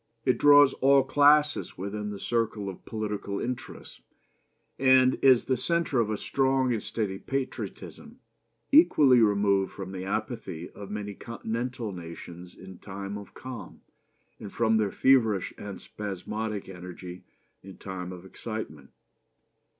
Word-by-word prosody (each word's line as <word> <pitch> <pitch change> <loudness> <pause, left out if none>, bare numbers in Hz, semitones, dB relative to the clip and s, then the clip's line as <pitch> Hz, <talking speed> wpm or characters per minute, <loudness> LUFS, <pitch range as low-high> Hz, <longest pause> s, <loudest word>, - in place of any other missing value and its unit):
It 125 -3 +2
draws 145 -1 +7
all 135 0 +4
classes 145 +2 +3
within 105 +2 -4
the 105 - -5
circle 110 -2 -1
of 95 - -10
political 105 -2 -3
interests, 125 0 -6 0.8
and 130 -1 +5
is 130 -3 +5
the 130 - +1
centre 170 -1 +1
of 110 -2 +1
a 105 - -1
strong 130 0 +1
and 110 - -2
steady 100 -4 -3
patriotism, 135 -1 -5 0.5
equally 150 - +6
removed 100 -3 +2
from 95 -1 -7
the 95 -1 -6
apathy 90 -3 -4
of 100 -1 -10
many 105 -1 -5
Continental 115 +1 -4
nations 85 0 -10
in 95 -1 -12
time 100 0 -7
of 100 -1 -10
calm, 130 -3 -9 0.6
and 100 - -8
from 110 -1 +2
their 105 -2 +1
feverish 115 -8 +3
and 100 -1 -8
spasmodic 105 +1 -5
energy 90 -1 -9 0.4
in 95 0 -12
time 90 -2 -6
of 90 0 -10
excitement. 95 - -7
105 Hz, 135 wpm, -27 LUFS, 95-130 Hz, 0.8 s, draws